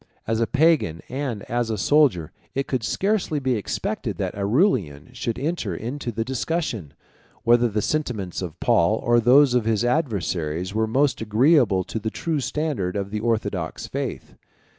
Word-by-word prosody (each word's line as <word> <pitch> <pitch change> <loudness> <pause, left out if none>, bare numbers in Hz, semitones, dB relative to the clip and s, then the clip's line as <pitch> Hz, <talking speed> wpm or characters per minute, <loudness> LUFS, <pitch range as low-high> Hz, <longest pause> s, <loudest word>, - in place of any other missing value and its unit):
As 115 0 0
a 115 - +2
Pagan 140 - +2
and 130 -5 -3
as 120 -1 -2
a 110 - -1
soldier, 115 - +3 0.2
it 135 0 0
could 130 -3 -1
scarcely 195 - 0
be 130 -2 0
expected 105 -4 -3
that - - -2
Aurelian 100 - 0
should 115 -2 -3
enter 160 +6 -2
into 125 +2 -4
the 115 +1 -3
discussion, 130 - -3 0.5
whether 120 +1 +4
the 105 -1 -1
sentiments 110 - -2
of 85 -4 -6
Paul 85 +6 +3
or 120 +1 +2
those 125 +3 +5
of 125 -3 +2
his 115 0 +1
adversaries 95 - -1
were 110 0 +1
most 135 +3 +1
agreeable 110 - +3
to 110 - -5
the 110 +1 -2
true 160 +5 -2
standard 140 - -2
of 100 -1 -3
the 105 - -2
orthodox 105 -7 -2
faith. - - -5
115 Hz, 160 wpm, -23 LUFS, 100-140 Hz, 0.5 s, those